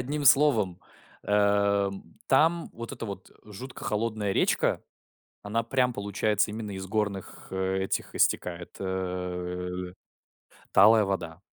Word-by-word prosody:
Одним 145 +4 -3
словом. 125 -10 +4 0.4
Эм, 100 -3 +1
там 165 +5 +3
вот 115 0 -7
эта - - -6
вот 100 -2 -8
жутко 115 +5 -9
холодная 105 -2 -1
речка, - - +1 0.6
она 115 +3 -1
прям 125 +1 +1
получается 100 +1 0
именно 110 -1 -5
из 95 -1 -5
горных 100 -3 -3
этих 95 0 -1
истекает, 85 -1 0
э, 90 -1 -4 0.8
талая 110 +2 +7
вода. 90 -3 -3
100 Hz, 110 wpm, -28 LUFS, 95-110 Hz, 0.8 s, талая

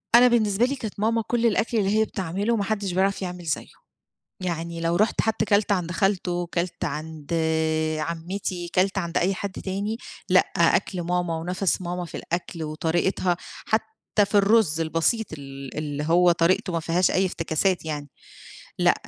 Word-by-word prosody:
أنا 245 +1 +8
بالنسبة 225 -1 +3
لي 275 - -1
كانت 220 -6 -6
ماما 225 +2 +2
كلّ 240 -1 +1
الأكل 230 +1 +2
اللي 195 -2 +2
هي 220 - +4
بتعمله 195 +5 -1
ما 205 - 0
حدّش 200 -2 -1
بيعرَف 195 +2 +1
يعمل 180 -2 -5
زيّه. 155 - -2 0.7
يعني 170 -2 -3
لو 170 +1 +1
رُحت 215 +4 +2
حتى 220 -1 0
كَلت 205 0 +2
عند 180 -3 0
خالته، 180 -1 0
كَلت 175 0 -2
عند 155 0 -5 0.7
عمّتي، 175 +2 -3
كَلت 190 +2 +2
عند 170 -3 -1
أي 190 +3 +2
حد 200 0 -4
تاني، 200 +3 -3 0.3
لأ، - - +7 0.2
أكْل 180 -3 +2
ماما 175 -1 -1
ونَفَس 180 +3 -1
ماما 175 0 -3
في - - -7
الأكل 170 -1 -4
وطريقتها، 170 +3 0 0.3
حتى 220 - 0
في 200 +1 -4
الرز 200 -5 +4
البسيط 165 +8 +1
ال 135 -2 -8
اللي 150 -1 -3
هو 175 +3 +5
طريقته 170 +2 +2
ما 165 - +1
فيهاش 170 +3 +2
أي 190 - +2
افتكاسات 175 +1 0
يعني. 145 -2 -4 0.7
لأ، - - +5
180 Hz, 165 wpm, -25 LUFS, 165-200 Hz, 0.7 s, أنا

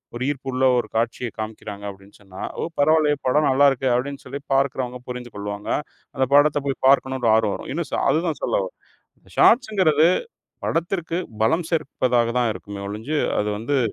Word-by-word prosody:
ஒரு 125 - -3
ஈர்ப்புள்ள 130 -2 -2
ஒரு 120 - -1
காட்சிய 115 +1 -1
காமிக்கிறாங்க 105 -2 -6
அப்டின்னு 100 +1 -14
சொன்னா, 95 -1 -11 0.2
ஓ! - - -1 0.2
பரவாயில்லயே 150 0 +4
படம் 150 +3 +3
நல்லா 140 +2 +5
இருக்கே, 130 0 -1
அப்டின்னு 140 +3 -3
சொல்லி 140 +2 -6
பார்க்கிறவங்க 130 -2 0
புரிஞ்சு 125 -2 -6
கொள்வாங்க, 100 0 -5 0.5
அந்த 130 - +2
படத்தை 145 0 +5
போய் 135 - -2
பார்க்கணும்னு 130 -1 +3
ஒரு 115 - +4
ஆர்வம் 110 -2 +2
வரும். - - -8
இன்னும் 165 -2 -3
சொ - - 0
அதுதான் 165 0 0
சொல்லவரன். - - -1 0.6
ஷாட்ஸ்ங்குறது 185 - +5 0.6
படத்திற்கு 170 0 -1 0.3
பலம் 160 +7 +1
சேர்ப்பதாகத் 125 -6 +1
தான் 120 - +2
இருக்குமே 100 -1 -8
ஒழிஞ்சு, 115 +9 -3 0.2
அது 105 - -1
வந்து 135 +5 0
130 Hz, 160 wpm, -23 LUFS, 115-150 Hz, 0.6 s, நல்லா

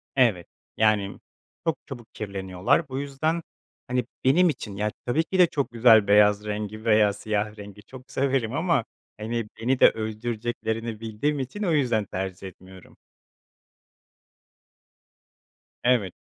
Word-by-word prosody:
Evet, 110 -10 +2 0.3
yani 105 -2 +2 0.5
çok 160 -5 +1
çabuk 120 -4 -10
kirleniyorlar. 95 +1 -1
Bu 130 +1 -3
yüzden, 150 +4 -1 0.5
hani, 125 -1 0 0.2
benim 170 +7 +5
için, 105 -9 -5
ya, 105 +1 -1
tabii 140 +7 +1
ki 185 +2 -3
de 180 - +8
çok 140 -5 -2
güzel 115 -3 +6
beyaz 105 0 +5
rengi 105 +1 -5
veya 105 -2 +4
siyah 105 +1 -2
rengi 105 0 -11
çok 130 +4 -13
severim 130 -4 0
ama, 160 -6 +1 0.3
hani, 115 +1 -3
beni 125 +3 0
de - - +8
öldüreceklerini 110 0 -4
bildiğim 115 +7 -2
için 135 +11 -4
o 180 - +1
yüzden 120 -8 +1
tercih 95 0 -5
etmiyorum. 95 0 -15 2.9
Evet. 120 -7 +2
115 Hz, 130 wpm, -25 LUFS, 105-130 Hz, 2.9 s, de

